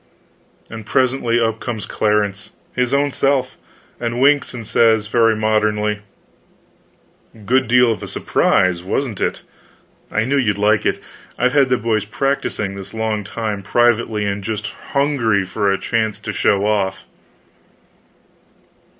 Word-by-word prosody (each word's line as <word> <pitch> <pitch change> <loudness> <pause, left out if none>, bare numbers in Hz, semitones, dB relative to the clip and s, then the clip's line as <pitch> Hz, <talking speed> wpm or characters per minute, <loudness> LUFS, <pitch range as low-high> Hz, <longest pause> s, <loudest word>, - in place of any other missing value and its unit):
And 110 -1 -8
presently 125 0 +1
up 115 -1 0
comes 110 -4 -4
Clarence, 105 -2 -1 0.2
his 125 0 0
own 140 +1 +2
self! 135 -1 0 0.4
and 120 0 -2
winks, 145 +1 +3
and 120 -3 -7
says, 110 -1 +3
very 115 +1 +3
modernly: 105 -1 0 1.5
"Good 130 +3 +2
deal 125 0 +4
of 110 - -4
a - - -6
surprise, 90 -2 +1
wasn't 110 +4 -3
it? - - -2 0.7
I 110 - +1
knew 135 +4 0
you'd 105 -6 +1
like 105 0 +2
it. - - 0 0.4
I've 125 +1 +1
had 140 -3 +4
the 125 - +3
boys 110 -2 -1
practicing 110 -4 -2
this 100 +2 -9
long 110 -1 -1
time, 105 0 -4
privately; 110 0 +1
and 100 0 -3
just 105 0 -3 0.3
hungry 125 -9 +2
for 100 +2 0
a 95 - +1
chance 110 -1 -1
to - - -5
show 100 0 +2
off." 95 -2 0
110 Hz, 140 wpm, -19 LUFS, 105-125 Hz, 1.5 s, deal